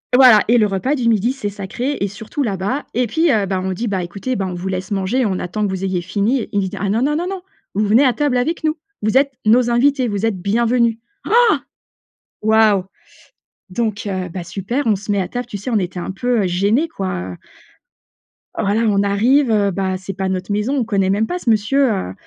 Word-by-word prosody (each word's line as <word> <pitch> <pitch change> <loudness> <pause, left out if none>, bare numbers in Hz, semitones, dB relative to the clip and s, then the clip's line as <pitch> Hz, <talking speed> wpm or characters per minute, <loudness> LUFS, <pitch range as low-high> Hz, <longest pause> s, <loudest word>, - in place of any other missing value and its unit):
Voilà 250 -5 +8
et 240 +2 +4
le 215 -2 +4
repas 205 +9 -1
du 240 -4 +1
midi, 225 +3 +2
c'est 240 -7 -4
sacré 210 +8 -4
et 200 - 0
surtout 210 +8 -6
là-bas 210 +4 -2
et 245 +1 +1
puis 320 +10 +1
heu, 215 -5 +2
ben, 190 -1 -2
on 190 0 -2
dit: 230 +6 -3
«Bah, 190 -3 -1
écoutez, 200 +9 -4
bah, 195 - -1
on 180 - -4
vous 175 +2 -5
laisse 190 +1 -4
manger. 205 +6 0
On 190 -3 0
attend 210 +4 -3
que - - -1
vous 190 0 -4
ayez 185 -2 -1
fini», 205 +7 0
il 205 - +2
nous 190 - -1
dit: - - -8
«Ah 200 - -1
non, 220 +4 +1
non, 295 +3 +1
non, 350 +2 -2
non! 385 -1 -5 0.3
Vous 210 +2 +1
venez 225 +7 +4
à 255 - +3
table 290 -3 0
avec 315 +8 -1
nous. 310 0 0 0.2
Vous 215 +4 +2
êtes 275 0 +2
nos 240 +3 +4
invités, 255 +2 +2
vous 205 -1 -1
êtes 220 -4 0
bienvenus», 230 +3 +2 0.3
Oh! 475 +2 +5 0.9
Waouh! 215 -3 +4 0.9
Donc 215 +1 -2
heu, 185 -2 -3
bah, 175 +1 -6
super, 220 +10 -3
on 215 - +4
se 205 +2 -5
met 200 - +1
à 180 - -3
table, 245 -1 -5
tu 210 - -6
sais, 205 +6 -6
on 225 -3 +2
était 180 -1 -4
un 175 - -4
peu, 235 +3 0
heu, - - +1
gênés, 200 - +1
quoi, 185 - -4
heu - - -8 1.2
voilà. 205 +3 0
On 200 -1 +2
arrive, 230 +7 +3
heu, 205 -2 +2
bah, 190 0 -1
c'est 190 +1 -7
pas 190 -1 -2
notre 185 +1 -3
maison. 210 +7 0
On - - 0
le - - +1
connaît 200 -4 0
même 205 +3 +1
pas, 360 - -3
ce 250 - -2
monsieur, 235 +6 +3
heu, 140 - -3
210 Hz, 240 wpm, -19 LUFS, 195-245 Hz, 1.2 s, Voilà